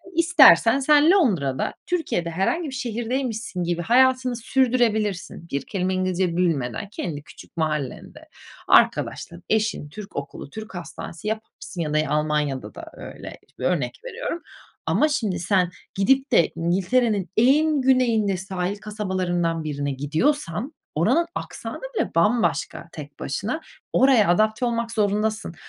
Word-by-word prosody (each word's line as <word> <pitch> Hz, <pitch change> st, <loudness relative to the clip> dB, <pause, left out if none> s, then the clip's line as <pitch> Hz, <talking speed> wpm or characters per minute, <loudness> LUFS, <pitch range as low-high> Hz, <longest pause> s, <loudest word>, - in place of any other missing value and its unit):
İstersen 275 Hz, -, +6 dB
sen 300 Hz, +4 st, +5 dB
Londra'da 180 Hz, -, +1 dB
Türkiye'de 320 Hz, -, -1 dB
herhangi 195 Hz, -, -1 dB
bir -, -, -8 dB
şehirdeymişsin 235 Hz, -4 st, -3 dB
gibi 175 Hz, 0 st, -1 dB
hayatını 255 Hz, +3 st, +3 dB
sürdürebilirsin. 225 Hz, -8 st, 0 dB
Bir 140 Hz, -1 st, -2 dB
kelime 185 Hz, -1 st, -2 dB
İngilizce 185 Hz, -2 st, 0 dB
bilmeden. 150 Hz, -, -1 dB
Kendi 160 Hz, -9 st, -5 dB
küçük -, -, -15 dB
mahallende, 150 Hz, -5 st, -3 dB, 0.4 s
arkadaşlar, 85 Hz, -, +2 dB
eşin, 215 Hz, -8 st, 0 dB
Türk 205 Hz, +5 st, -10 dB
okulu, 140 Hz, 0 st, -6 dB
Türk 215 Hz, 0 st, -9 dB
hastanesi 170 Hz, +1 st, -7 dB
yaparsın 215 Hz, -5 st, -5 dB
ya 150 Hz, -1 st, -2 dB
da 155 Hz, -, +3 dB
Almanya'da 150 Hz, -3 st, -1 dB
da -, -, -8 dB
öyle, -, -, -9 dB, 0.2 s
örnek -, -, -1 dB
veriyorum. 470 Hz, -8 st, -4 dB, 0.4 s
Ama 305 Hz, -, +3 dB
şimdi 220 Hz, -, -1 dB
sen 180 Hz, 0 st, +2 dB, 0.2 s
gidip 265 Hz, +8 st, +2 dB
de 170 Hz, -8 st, +4 dB
İngiltere'nin 190 Hz, +4 st, +1 dB
en 290 Hz, +4 st, +4 dB
güneyinde 230 Hz, -7 st, +2 dB
sahil 190 Hz, +1 st, -3 dB
kasabalarından 185 Hz, -6 st, -2 dB
birine 145 Hz, -2 st, -3 dB
gidiyorsan. 165 Hz, -, -1 dB, 0.2 s
Oranın 340 Hz, 0 st, +2 dB
aksanı -, -, -6 dB
bile -, -, 0 dB
bambaşka 170 Hz, -, +1 dB
tek 145 Hz, -2 st, -10 dB
başına, 210 Hz, -, -3 dB, 0.3 s
oraya 250 Hz, -7 st, +5 dB
adapte 215 Hz, +6 st, +2 dB
olmak 235 Hz, -1 st, -1 dB
zorundasın. 210 Hz, -3 st, -1 dB
205 Hz, 125 wpm, -23 LUFS, 170-250 Hz, 0.4 s, İstersen